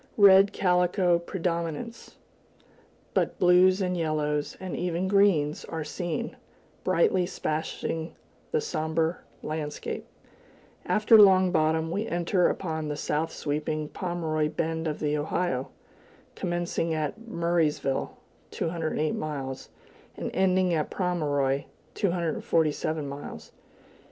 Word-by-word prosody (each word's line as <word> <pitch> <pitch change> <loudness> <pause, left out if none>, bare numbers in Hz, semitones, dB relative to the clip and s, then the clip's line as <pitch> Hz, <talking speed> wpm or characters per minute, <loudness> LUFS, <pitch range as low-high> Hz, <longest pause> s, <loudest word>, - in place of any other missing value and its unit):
Red 200 -1 +7
calico 180 -1 +2
predominates, 170 +5 -4 1.0
but - - 0
blues 185 +2 +5
and 180 -1 0
yellows, 150 -3 -1
and 185 -2 -5
even 175 +1 -1
greens, 190 -7 +3
are 160 -1 -4
seen, 160 +3 -4 0.5
brightly 185 0 +2
splashing 160 -1 -3 0.4
the 465 - +1
somber 160 - -1 0.2
landscape. 155 -1 -4 0.8
After 215 +1 +6
Long 190 -2 +6
Bottom, 160 -1 +1
we 210 +5 -2
enter 175 +1 +2
upon 160 -4 -3
the 150 - -2
south 155 +2 -1
sweeping 150 +1 -2
Pomeroy 160 -4 -1
Bend 160 +1 -2
of 150 - -2
the 150 -1 0
Ohio, 150 -2 -1 0.6
commencing 175 -2 -2
at 155 +6 -2
Murraysville 170 -7 0 0.3
(208 160 -2 -1
miles) 135 -4 -5 0.5
and - - -4
ending 185 -1 +2
at 155 -2 0
Pomeroy 145 -7 0 0.3
(247 160 -4 0
miles). 140 +1 -8
165 Hz, 105 wpm, -27 LUFS, 155-180 Hz, 1.0 s, Red